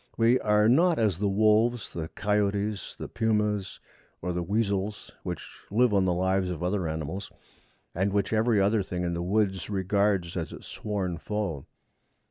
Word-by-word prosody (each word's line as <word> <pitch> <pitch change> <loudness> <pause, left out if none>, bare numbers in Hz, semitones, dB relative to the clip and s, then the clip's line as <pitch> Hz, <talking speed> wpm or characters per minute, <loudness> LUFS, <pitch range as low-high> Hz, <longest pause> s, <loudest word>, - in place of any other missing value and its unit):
We 115 +2 +4
are 105 0 +3
not 165 +7 +4
as 105 -6 +1
the 100 -1 +1
wolves, 110 +3 +2
the 80 -2 -4
coyotes, 105 +1 -1
the - - -6
pumas, 105 -3 0 0.4
or 90 +1 -3
the 90 - -1
weasels, 100 +1 -1
which - - -5 0.2
live 115 +2 +3
on 95 -2 +3
the 90 - +2
lives 95 +1 +1
of 90 -1 -4
other 90 -1 0
animals, 80 +5 -4 0.6
and 95 +3 0
which 100 +2 0
every 110 0 +3
other 100 +2 +3
thing 90 -1 -4
in 85 -1 -1
the 85 - -2
woods 95 0 0
regards 100 -2 +1
as 85 -3 -3
its - - -10
sworn 95 -5 -3
foe. 100 -8 -3
100 Hz, 165 wpm, -27 LUFS, 90-105 Hz, 0.6 s, We